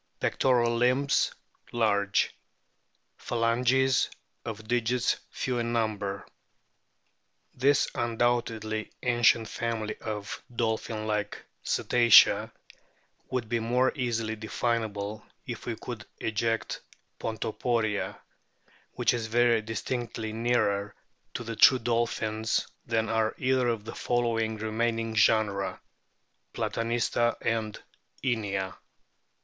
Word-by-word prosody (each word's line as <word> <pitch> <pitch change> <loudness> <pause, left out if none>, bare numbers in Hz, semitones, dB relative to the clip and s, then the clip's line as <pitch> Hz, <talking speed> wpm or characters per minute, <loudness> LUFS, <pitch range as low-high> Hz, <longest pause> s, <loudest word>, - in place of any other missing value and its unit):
Pectoral 120 -3 +2
limbs 130 +4 +2 0.4
large; 100 -4 +1 0.8
phalanges 125 +3 +2 0.3
of 110 -2 -7
digits 120 +1 +1
few 125 -2 -2
in 120 0 -1
number. 105 -4 -1 1.3
This 140 +3 +3
undoubtedly 115 -2 -1
ancient 120 -2 +4
family 115 -2 -3
of 105 -2 -5
dolphin 110 -1 -1
like 105 -1 -2 0.2
Cetacea 120 -2 +5 0.8
would 125 -3 -2
be 120 +1 0
more 125 +3 +2
easily 115 -4 -1
definable 110 -2 -2 0.2
if - - -7
we - - -1
could - - -7 0.2
eject 115 +1 -1 0.4
Pontoporia, 110 -1 -1 0.8
which 120 0 +2
is 115 -2 -2
very 120 0 +3
distinctly 110 0 -4
nearer 110 -3 0 0.4
to 120 - -3
the 115 0 -5
true 130 +4 +7
dolphins 115 -2 0 0.2
than 115 -1 +1
are 110 0 +1
either 130 -1 +2
of 115 -3 -1
the - - -5
two 120 -1 0 0.3
remaining 115 0 -1
genera, 105 -2 +2 0.8
Platanista 120 0 0
and 110 -2 -1 0.4
Inia. 100 -7 -1
115 Hz, 95 wpm, -28 LUFS, 110-120 Hz, 1.3 s, true